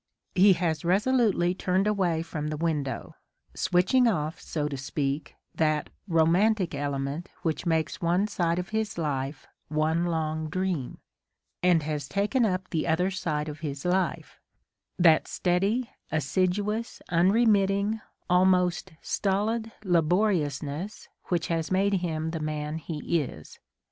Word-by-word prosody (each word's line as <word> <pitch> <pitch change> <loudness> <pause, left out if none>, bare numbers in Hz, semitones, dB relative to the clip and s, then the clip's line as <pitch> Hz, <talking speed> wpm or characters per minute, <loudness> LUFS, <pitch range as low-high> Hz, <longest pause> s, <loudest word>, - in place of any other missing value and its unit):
He 195 +1 +6
has 165 -3 -1
resolutely 200 -1 +2
turned 185 +1 0
away 185 -6 +1
from 155 -2 -4
the 155 0 -3
window, 150 -4 -2 0.2
— - - -52
switching 185 +8 +3
off, 155 -7 -1
so 150 -2 -2
to 145 - -4
speak, 140 +2 -3 0.2
that 155 -2 0 0.2
"romantic 180 +3 +3
element 140 +3 -3
which 165 +1 -1
makes 160 -3 0
one 175 +4 +2
side 175 -5 0
of 180 +1 -3
his 220 -2 -2
life 140 -3 -2 0.2
one 155 +3 +1
long 160 -1 -2
dream," 180 -6 -2 0.3
— - - -54
and 175 -3 +4
has 150 -2 -3
taken 215 +4 +2
up 185 -1 -2
the 160 -1 -1
other 180 +4 +2
side 155 -5 -2
of 150 0 -6
his 145 -2 -5
life, 185 +1 -1 0.3
— - - -56
that 160 -1 +5
steady, 200 +7 0 0.2
assiduous, 190 - -1
unremitting, 200 +3 +3 0.3
almost 180 -1 +3
stolid 220 +3 0
laboriousness 170 -2 0 0.2
which 170 -3 0
has 165 -1 -1
made 195 +2 +2
him 160 -2 -2
the 165 - -3
man 155 0 -3
he 160 +1 -1
is. 75 - -9
170 Hz, 135 wpm, -27 LUFS, 155-195 Hz, 0.3 s, He